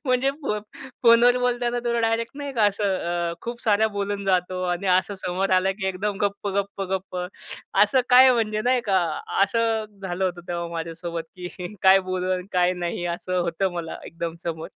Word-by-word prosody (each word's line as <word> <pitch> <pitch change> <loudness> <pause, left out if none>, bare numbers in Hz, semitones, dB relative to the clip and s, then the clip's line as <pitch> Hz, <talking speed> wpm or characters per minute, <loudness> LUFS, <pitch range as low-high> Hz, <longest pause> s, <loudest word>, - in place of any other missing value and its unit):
म्हणजे 255 +1 +2
फो 210 -6 -1 0.4
फोनवर 240 +1 +6
बोलताना 245 -1 0
तुला 235 0 +1
डायरेक्ट 225 0 0
नाही 285 -1 -5
का, 225 -5 +2
असं 205 +1 -1 0.5
अ, 170 - -5
खूप 235 0 -5
सारा 220 -1 +3
बोलून 200 0 -2
जातो 185 -1 0
आणि 180 +1 -1
असं 200 +2 -3
समोर 185 +2 -1
आला 190 +1 +2
की 190 - -1
एकदम 195 +2 -2
गप्प, 200 0 -1
गप्प, 200 0 -2
गप्प. 190 -1 -3 0.7
असं 260 - +4
काय 255 +1 +8
म्हणजे 215 -2 0
नाही 250 0 +3
का. 190 -2 +3 0.4
असं 225 +1 +1 0.2
झालं 190 0 -2
होतं 175 -1 -2
तेव्हा 170 -1 -3
माझ्यासोबत 165 0 -4
की 180 +2 -7
काय 190 0 +7
बोलू 185 0 -1
आणि 180 0 -3
काय 180 0 +3
नाही 175 0 -3
असं 185 +1 -3
होतं 175 +2 -1
मला 170 -2 -5
एकदम 165 0 -5
समोर. 160 -1 -4
195 Hz, 180 wpm, -24 LUFS, 180-230 Hz, 0.7 s, काय